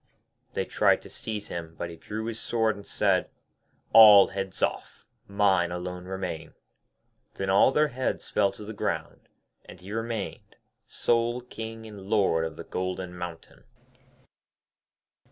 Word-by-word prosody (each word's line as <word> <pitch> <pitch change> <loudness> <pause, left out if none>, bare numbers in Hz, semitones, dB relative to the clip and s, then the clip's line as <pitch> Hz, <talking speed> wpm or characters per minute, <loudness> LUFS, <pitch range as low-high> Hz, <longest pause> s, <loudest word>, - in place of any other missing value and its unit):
They - - -1
tried - - +2
to - - -12
seize 105 -2 -5
him, 80 -1 -6
but 85 - -4
he - - -9
drew 110 +7 -6
his 115 0 -4
sword 110 -2 0
and 100 - -12
said, - - +1 0.6
'All 105 -3 +10
heads 95 -1 -4
off, - - -3 0.2
mine 95 -4 +2
alone 90 0 -5
remain.' 90 -4 -5 0.8
Then 95 0 -1
all 100 +7 +6
their 150 +2 +3
heads 130 0 -3
fell 100 -2 +2
to 105 - -10
the 110 - -6
ground, 100 - -4 0.4
and - - -12
he 95 +3 -11
remained 115 -1 -4 0.3
sole 120 +1 0
King 115 -2 -8
and 105 -3 -10
Lord 95 -7 +2
of 80 -1 -6
the - - -8
Golden 90 -1 -4
Mountain. 90 -2 -8
100 Hz, 145 wpm, -27 LUFS, 90-110 Hz, 0.8 s, All